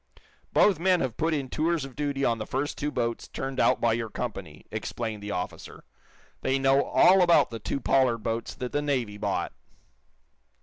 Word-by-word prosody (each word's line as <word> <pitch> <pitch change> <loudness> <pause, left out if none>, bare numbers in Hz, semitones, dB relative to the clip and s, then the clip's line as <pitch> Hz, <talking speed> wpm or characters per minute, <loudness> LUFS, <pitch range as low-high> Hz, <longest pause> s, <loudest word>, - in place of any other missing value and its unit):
"Both 195 -6 +4
men 185 0 +3
have 130 -4 -2
put 165 +1 0
in 140 -4 -1
tours 160 +1 0
of 135 - -11
duty 140 -2 -1
on 115 -1 +1
the 110 - -5
first 140 +3 -2
two 150 - -2
boats 115 -5 -2
turned 135 0 -5
out - - +3
by 115 -1 +2
your 115 -1 -2
company," 100 -11 -6
explained 110 -3 -4
the 105 - -6
officer. 90 -2 -5 0.6
"They 135 - +1
know 135 +1 +3
all 190 +1 +5
about 170 -7 +4
the 115 - -5
two 125 - -3
Pollard 130 -5 +2
boats 115 0 -3
that 125 -1 -5
the 145 - 0
Navy 125 -8 -1
bought." - - -2
130 Hz, 185 wpm, -27 LUFS, 115-145 Hz, 0.6 s, all